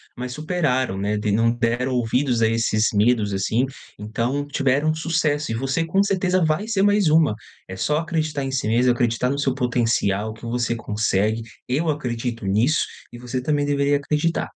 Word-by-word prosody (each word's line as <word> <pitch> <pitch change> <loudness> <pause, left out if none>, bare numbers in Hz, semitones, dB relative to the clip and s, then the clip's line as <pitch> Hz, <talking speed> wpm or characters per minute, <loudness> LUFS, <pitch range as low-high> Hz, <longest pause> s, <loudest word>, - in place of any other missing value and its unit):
mas 125 +1 -5
superaram, 150 - 0
né, 105 +2 -1
tem 105 0 -1
não 115 +2 +3
deram 120 +2 0
ouvidos 120 0 +1
a - - +5
esses 115 -1 +1
medos, 105 -1 +2
assim, 110 +6 +1 0.3
então 120 +7 -2
tiveram 140 +2 +1
sucesso 155 -4 -1
e - - -1
você, 135 +7 -1
com 190 +5 +2
certeza, 185 -2 +1
vai 155 +8 0
ser 200 -4 +1
mais 205 -3 +3
uma. 155 -7 +4 0.3
É 95 - -7
só 150 +10 0
acreditar 155 -3 -2
em 135 - -3
si 130 -5 -1
mesma, 120 +3 +3
acreditar 120 +1 0
no 140 - -2
seu 135 -2 +1
potencial, 115 -5 0
que 110 - -17
você 120 0 -1
consegue, 110 0 0 0.3
eu 155 +6 0
acredito 120 -6 -3
nisso 110 +10 +2 0.3
e 120 - -10
você 125 +1 -4
também 145 +1 0
deveria 145 0 +2
acreditar. 150 +3 -1
125 Hz, 175 wpm, -22 LUFS, 115-150 Hz, 0.3 s, a